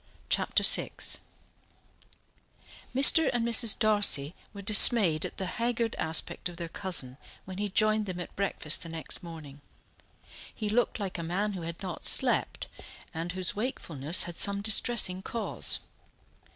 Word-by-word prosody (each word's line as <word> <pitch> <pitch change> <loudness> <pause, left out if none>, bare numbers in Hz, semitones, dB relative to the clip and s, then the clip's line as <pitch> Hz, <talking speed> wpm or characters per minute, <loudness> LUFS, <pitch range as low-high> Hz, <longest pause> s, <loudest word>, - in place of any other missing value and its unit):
Chapter - - 0
VI - - +4 2.1
Mr. 280 +3 +7
and 235 -2 -2
Mrs. 230 -1 +4
Darcy 205 -9 +3 0.2
were 200 -1 -11
dismayed 200 -5 +6
at - - -15
the 190 - -4
haggard 230 +3 -3
aspect 160 +2 -3
of 175 - -13
their 170 -1 -6
cousin 165 -10 -4 0.3
when 185 0 -9
he 205 0 -3
joined 215 +1 0
them 180 -1 -6
at 175 - -8
breakfast 190 -5 -3
the 165 - -7
next 165 -1 -6
morning. 155 -4 -12 0.9
He 215 -2 -6
looked 240 +1 -1
like 190 -4 -5
a - - -4
man 195 +5 -3
who 185 - -7
had 170 +3 -8
not 180 -3 -6
slept, - - 0 0.5
and 165 +2 -6
whose 185 -2 0
wakefulness 170 - -1
had 175 -1 -8
some 200 0 0
distressing 210 -3 +2
cause. 230 +3 -2
190 Hz, 145 wpm, -27 LUFS, 170-215 Hz, 2.1 s, Mr